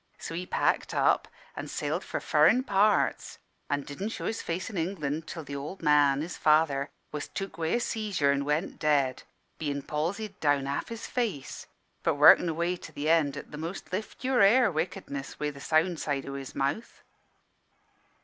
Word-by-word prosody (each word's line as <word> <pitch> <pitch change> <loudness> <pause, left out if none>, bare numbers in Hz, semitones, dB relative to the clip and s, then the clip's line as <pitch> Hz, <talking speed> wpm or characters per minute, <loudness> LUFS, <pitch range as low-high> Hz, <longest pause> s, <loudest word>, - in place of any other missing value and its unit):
So - - -7
he 180 +2 -4
packed - - 0
up - - +3 0.3
and - - -6
sailed - - -2
for - - -4
furrin' 255 +1 +4
parts, 200 - +2 0.3
an' 145 0 0
didn' 190 +11 -5
show - - -5
his 225 - -2
face 175 +2 -3
in 220 - -7
England 160 -3 -2
till 165 -3 -6
th' 140 - -10
ould 145 +6 -6
man, 145 -2 +4
his 170 +3 -5
father, 150 -2 +3 0.2
was 150 -1 -4
took 195 -3 -6
wi' 160 +4 +1
a - - +2
seizure 205 -11 0
an' 140 0 0
went 150 +5 -1
dead, 140 -4 +2 0.4
bein' 140 -2 -2
palsied 190 +8 -3
down 145 -2 +2
half 140 +1 -3
his 230 -1 -6
face, 215 - -3 0.3
but - - +1
workin' 175 - +7
away 170 +3 -1
to 155 - -11
the 150 +1 -2
end 145 -4 +2
at - - -9
the 150 - -7
most 170 +3 -6
lift 215 +6 -5
your 255 -2 +2
hair 215 +3 +6
wickedness 155 -4 -4
wi' 150 0 -1
the 140 -1 -12
sound 165 +2 +2
side 140 -2 -2
of 140 - -6
his 135 -1 -7
mouth. 140 +12 -2
155 Hz, 185 wpm, -28 LUFS, 145-190 Hz, 0.4 s, workin